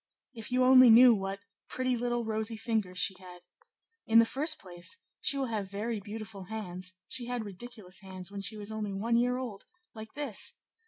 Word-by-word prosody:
If 225 Hz, -1 st, -8 dB
you 255 Hz, 0 st, +3 dB
only 255 Hz, -1 st, +8 dB
knew 240 Hz, +2 st, +9 dB
what 195 Hz, -1 st, -3 dB, 0.3 s
pretty 255 Hz, -1 st, 0 dB
little 240 Hz, 0 st, -1 dB
rosy 220 Hz, 0 st, -2 dB
fingers 215 Hz, -6 st, -2 dB
she 190 Hz, -, +3 dB
had! 180 Hz, -1 st, -13 dB, 0.6 s
In 225 Hz, -, +5 dB
the 230 Hz, -, +8 dB
first 305 Hz, +6 st, +1 dB
place, 175 Hz, -, -6 dB, 0.2 s
she 280 Hz, -, 0 dB
will 270 Hz, -, 0 dB
have 215 Hz, -5 st, -3 dB
very 215 Hz, +3 st, -3 dB
beautiful 210 Hz, -1 st, -8 dB
hands; 185 Hz, -3 st, -6 dB
she 245 Hz, -2 st, -3 dB
had 245 Hz, -3 st, -3 dB
ridiculous 205 Hz, -1 st, -8 dB
hands 190 Hz, -1 st, -9 dB
when 200 Hz, 0 st, -5 dB
she 215 Hz, +2 st, -1 dB
was 205 Hz, +1 st, -5 dB
only 215 Hz, -2 st, -3 dB
a 230 Hz, +3 st, -3 dB
year 250 Hz, +1 st, +1 dB
old; 235 Hz, -6 st, -6 dB, 0.3 s
like 220 Hz, -1 st, -10 dB
this! 280 Hz, -8 st, 0 dB
220 Hz, 190 wpm, -30 LUFS, 195-245 Hz, 0.6 s, knew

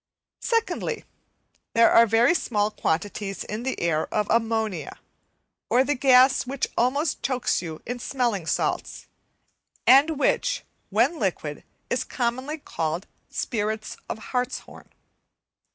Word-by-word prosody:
Secondly, 460 Hz, -1 st, -1 dB, 0.7 s
there 230 Hz, 0 st, +6 dB
are 230 Hz, 0 st, +7 dB
very 230 Hz, +8 st, +4 dB
small 210 Hz, -10 st, 0 dB
quantities 195 Hz, +3 st, -2 dB
of 210 Hz, -4 st, -1 dB
ammonia, 220 Hz, -8 st, 0 dB, 0.7 s
or 255 Hz, -, +4 dB
the 290 Hz, +2 st, +1 dB
gas 260 Hz, -1 st, +5 dB
which 275 Hz, +1 st, -1 dB
almost 280 Hz, +6 st, +1 dB
chokes 255 Hz, -2 st, 0 dB
you 160 Hz, -3 st, -7 dB
in 245 Hz, +1 st, -4 dB
smelling 235 Hz, -10 st, -1 dB
salts, -, -, -1 dB, 0.8 s
and 285 Hz, +4 st, +6 dB
which, -, -, +1 dB, 0.3 s
when 340 Hz, -, +2 dB
liquid -, -, -2 dB, 0.3 s
is -, -, +1 dB
commonly 255 Hz, +5 st, -2 dB
called 165 Hz, -, -3 dB, 0.2 s
"spirits 215 Hz, -1 st, -3 dB
of -, -, -3 dB, 0.2 s
hartshorn." 250 Hz, 0 st, -4 dB
235 Hz, 105 wpm, -25 LUFS, 210-265 Hz, 0.8 s, are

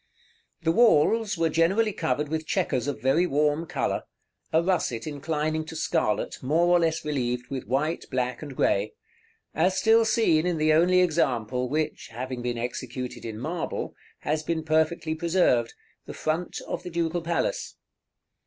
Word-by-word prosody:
§ -, -, -45 dB
XXXII. -, -, -37 dB
The 165 Hz, -, +4 dB
walls 220 Hz, 0 st, +4 dB
were 165 Hz, 0 st, +2 dB
generally 190 Hz, +7 st, +2 dB
covered 150 Hz, -2 st, -1 dB
with 160 Hz, 0 st, -3 dB
chequers 145 Hz, -9 st, 0 dB
of 140 Hz, -6 st, -3 dB
very 160 Hz, +7 st, +3 dB
warm 150 Hz, +2 st, +1 dB
color, -, -, -1 dB, 0.5 s
a 160 Hz, +1 st, +3 dB
russet 165 Hz, -11 st, 0 dB
inclining 155 Hz, +1 st, -2 dB
to 160 Hz, -, -9 dB
scarlet, 155 Hz, -10 st, -1 dB
more 155 Hz, +6 st, +2 dB
or -, -, +5 dB
less 165 Hz, -1 st, 0 dB
relieved 125 Hz, -4 st, -2 dB
with 130 Hz, -5 st, -4 dB
white, 150 Hz, +7 st, -1 dB
black, 125 Hz, -1 st, -2 dB
and 145 Hz, -3 st, -8 dB
grey; 100 Hz, -2 st, +1 dB, 0.6 s
as 185 Hz, +4 st, +2 dB
still 225 Hz, +2 st, +5 dB
seen 220 Hz, -8 st, +2 dB
in 175 Hz, -2 st, 0 dB
the 155 Hz, 0 st, +3 dB
only 180 Hz, +3 st, +5 dB
example 125 Hz, -8 st, 0 dB
which, 155 Hz, +2 st, -2 dB
having 125 Hz, +2 st, -5 dB
been 120 Hz, 0 st, -2 dB
executed 125 Hz, 0 st, -5 dB
in 110 Hz, -2 st, -5 dB
marble, 160 Hz, +8 st, -4 dB, 0.3 s
has 155 Hz, +2 st, -1 dB
been 160 Hz, 0 st, -2 dB
perfectly 160 Hz, +1 st, +1 dB
preserved, 160 Hz, -8 st, +1 dB, 0.3 s
the -, -, -7 dB
front 160 Hz, +3 st, -2 dB
of -, -, -3 dB
the 180 Hz, -, -7 dB
Ducal 170 Hz, 0 st, -1 dB
Palace. -, -, -2 dB
155 Hz, 160 wpm, -26 LUFS, 130-170 Hz, 0.6 s, or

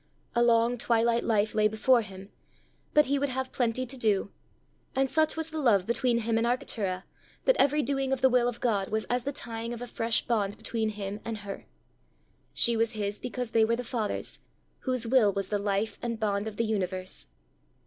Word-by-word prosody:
A 235 Hz, -, +2 dB
long 235 Hz, 0 st, +3 dB
twilight 235 Hz, 0 st, +2 dB
life 215 Hz, -2 st, +1 dB
lay 215 Hz, -1 st, +4 dB
before 235 Hz, +3 st, +3 dB
him, 195 Hz, -1 st, -10 dB, 0.6 s
but 300 Hz, 0 st, +5 dB
he 280 Hz, +1 st, +1 dB
would 285 Hz, 0 st, 0 dB
have 260 Hz, 0 st, -3 dB
plenty 245 Hz, +1 st, 0 dB
to 260 Hz, +2 st, -7 dB
do! 210 Hz, -5 st, +1 dB, 0.6 s
and 270 Hz, 0 st, +1 dB
such 315 Hz, 0 st, +2 dB
was 320 Hz, 0 st, +1 dB
the 315 Hz, -, -3 dB
love 205 Hz, -8 st, +4 dB
between 235 Hz, +1 st, +1 dB
him 225 Hz, 0 st, +1 dB
and 235 Hz, -, +1 dB
Arctura, 200 Hz, -6 st, -1 dB, 0.4 s
that -, -, +5 dB
every 290 Hz, +2 st, +4 dB
doing 270 Hz, -1 st, -1 dB
of 265 Hz, -1 st, 0 dB
the 265 Hz, -, +7 dB
will 250 Hz, -1 st, +3 dB
of 245 Hz, -1 st, -3 dB
God 205 Hz, -5 st, 0 dB
was 220 Hz, 0 st, -1 dB
as 245 Hz, 0 st, 0 dB
the 280 Hz, -, -1 dB
tying 230 Hz, -3 st, -5 dB
of 235 Hz, -, -6 dB
a -, -, -3 dB
fresh 230 Hz, -1 st, 0 dB
bond 205 Hz, -4 st, 0 dB
between 220 Hz, 0 st, -1 dB
him 205 Hz, -1 st, -5 dB
and 225 Hz, -1 st, -4 dB
her: 205 Hz, -1 st, -8 dB, 0.8 s
she 235 Hz, -, +3 dB
was 230 Hz, 0 st, +1 dB
his 205 Hz, -1 st, -3 dB
because 250 Hz, -1 st, -4 dB
they 225 Hz, -, +4 dB
were 230 Hz, +1 st, +2 dB
the 245 Hz, -, -4 dB
Father's, 225 Hz, -3 st, -3 dB, 0.4 s
whose 255 Hz, -3 st, 0 dB
will 230 Hz, -3 st, +4 dB
was 195 Hz, -1 st, -2 dB
the 205 Hz, -, 0 dB
life 200 Hz, +2 st, -1 dB
and 230 Hz, -2 st, -3 dB
bond 205 Hz, -1 st, 0 dB
of 215 Hz, -, -6 dB
the 230 Hz, -, +1 dB
universe. 185 Hz, -, -3 dB
230 Hz, 205 wpm, -28 LUFS, 210-250 Hz, 0.8 s, the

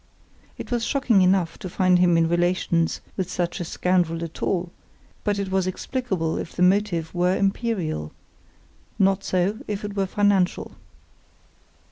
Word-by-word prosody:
It -, -, -8 dB
was 240 Hz, -1 st, 0 dB
shocking 245 Hz, -7 st, +2 dB
enough 185 Hz, -2 st, +2 dB
to 185 Hz, -, -6 dB
find 180 Hz, 0 st, +3 dB
him 175 Hz, -2 st, +4 dB
in 165 Hz, 0 st, +3 dB
relations 175 Hz, -1 st, +1 dB
with 185 Hz, -2 st, -2 dB
such 175 Hz, +1 st, -2 dB
a -, -, -2 dB
scoundrel 170 Hz, -1 st, 0 dB
at 165 Hz, -1 st, -8 dB
all, 175 Hz, -2 st, -1 dB, 0.5 s
but 205 Hz, -1 st, 0 dB
it 195 Hz, -1 st, -3 dB
was 190 Hz, -1 st, +1 dB
explicable 185 Hz, -5 st, -2 dB
if -, -, -7 dB
the 180 Hz, -, +1 dB
motive 180 Hz, -3 st, +1 dB
were 180 Hz, +1 st, +2 dB
imperial—not 195 Hz, -, -3 dB
so 190 Hz, +4 st, 0 dB
if 205 Hz, 0 st, -3 dB
it 205 Hz, -1 st, -6 dB
were 195 Hz, -1 st, 0 dB
financial. 200 Hz, -2 st, +1 dB
185 Hz, 145 wpm, -24 LUFS, 175-200 Hz, 0.5 s, him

